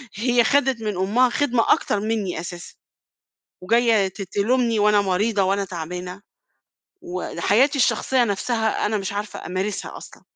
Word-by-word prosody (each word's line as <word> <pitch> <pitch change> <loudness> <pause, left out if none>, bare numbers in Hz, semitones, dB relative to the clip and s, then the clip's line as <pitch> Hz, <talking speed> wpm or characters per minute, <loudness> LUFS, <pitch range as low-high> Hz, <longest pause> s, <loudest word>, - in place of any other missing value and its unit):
هي 240 +3 +2
أخدِت 265 0 +2
من 210 -3 -3
أمها 220 +7 +2
خدمة 250 -3 +2
أكتر 210 - -1
منّي 210 -5 -2
أساسًا. 175 0 -8 0.9
وجاية 225 -1 +3
ت 195 +2 -8
تلومني 225 +4 0
وأنا 210 0 +4
مريضة 200 +2 0
وأنا 195 +1 0
تعبانة 180 +2 -7 0.8
وحياتي 205 - 0
الشخصية 255 0 +2
نفْسها 220 +2 -1
أنا 215 +1 0
مش 195 0 -4
عارفة 205 -1 -6
أمارسها 190 +3 -4
أصلًا. - - -13
210 Hz, 135 wpm, -22 LUFS, 190-235 Hz, 0.9 s, وأنا